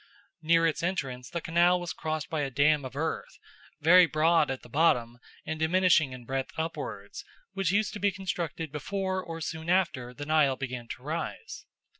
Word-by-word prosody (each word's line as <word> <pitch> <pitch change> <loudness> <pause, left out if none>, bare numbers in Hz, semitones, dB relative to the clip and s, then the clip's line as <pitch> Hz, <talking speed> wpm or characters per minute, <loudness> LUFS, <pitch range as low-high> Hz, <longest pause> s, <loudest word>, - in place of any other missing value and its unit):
Near 165 +1 +4
its 165 - 0
entrance 135 -8 -3
the 170 - -4
canal 175 +2 +3
was 175 -1 -4
crossed 155 -2 -3
by 160 -2 0
a 140 - -1
dam 145 +2 +2
of 130 - -8
earth, 160 +3 -3 0.4
very 175 +3 +7
broad 155 +1 +3
at 135 -1 -4
the - - -12
bottom 120 -4 +2 0.3
and 160 0 -4
diminishing 165 -3 +3
in 125 -1 -9
breadth 135 +1 -3
upwards, 160 +1 -5 0.3
which 195 -3 0
used 210 +1 +1
to 210 - -6
be 205 - +3
constructed 170 -4 -4
before 190 +5 -2
or 165 -1 -7
soon 160 +1 -5
after 170 -10 +1
the 145 +4 -8
Nile 150 -3 +3
began 125 -3 -5
to 125 - -8
rise. 165 - -5
160 Hz, 180 wpm, -28 LUFS, 135-175 Hz, 0.4 s, very